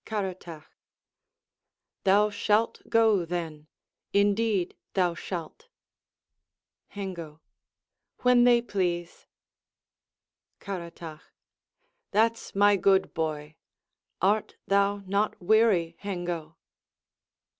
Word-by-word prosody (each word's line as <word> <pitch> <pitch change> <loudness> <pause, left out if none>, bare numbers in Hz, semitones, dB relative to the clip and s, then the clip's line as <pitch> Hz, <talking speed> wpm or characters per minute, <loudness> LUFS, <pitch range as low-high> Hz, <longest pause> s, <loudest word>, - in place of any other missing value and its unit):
Caratach 185 -7 -5 1.4
Thou 205 +2 +4
shalt 210 +2 +1
go, 220 -5 +4
then; 160 -3 -5 0.5
Indeed 200 -2 +1 0.2
thou 180 -3 +2
shalt. 175 - -7 1.2
Hengo 170 -6 -7 0.8
When 250 -1 +5
they 240 -1 +5
please. 175 -6 -3 1.3
Caratach 170 -4 -7 0.9
That's 225 +2 0
my 205 0 +5
good 190 +1 +2
boy! 155 -2 -4 0.7
Art 205 +3 +1
thou 200 0 +1
not 200 +3 -1
weary, 185 -4 +2
Hengo? 175 -5 -5
195 Hz, 75 wpm, -27 LUFS, 170-210 Hz, 1.4 s, When